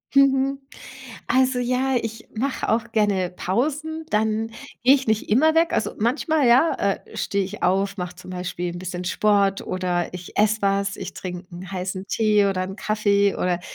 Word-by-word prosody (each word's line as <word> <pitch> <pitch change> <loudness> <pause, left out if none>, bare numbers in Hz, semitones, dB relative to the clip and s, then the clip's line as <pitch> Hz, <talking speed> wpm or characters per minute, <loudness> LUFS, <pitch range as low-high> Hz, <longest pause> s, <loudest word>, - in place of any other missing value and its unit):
Mhm. 275 0 +4 0.7
Also, 260 0 +2
ja, 255 +2 +1
ich 225 0 -6
mache 260 +5 -2
auch 230 +1 0
gerne 200 -4 +1
Pausen, 300 - -2
dann 220 0 0 0.3
gehe 255 +3 +7
ich 270 -3 -1
nicht 220 -1 0
immer 305 +9 +4
weg. 330 +1 +3
Also, - - 0
manchmal 280 +6 +1
ja, 255 +7 +5
äh, 200 -1 -2
stehe 200 -1 0
ich 200 +3 -8
auf, 195 +2 +1
mache 180 0 -4
zum 185 +1 -11
Beispiel 180 -1 -4
'n - - -6
bisschen 180 0 -5
Sport 200 +1 +2
oder 180 -1 -2
ich 180 -1 -8
esse 215 0 +2
was, 195 0 +1
ich - - -6
trinke 180 0 -7
'n 180 +2 -9
heißen 185 +1 -4
Tee 210 -2 +3
oder 190 -2 0
'n 190 +1 -5
Kaffee 205 -2 +2
oder 180 -1 -1
210 Hz, 175 wpm, -23 LUFS, 185-250 Hz, 0.7 s, gehe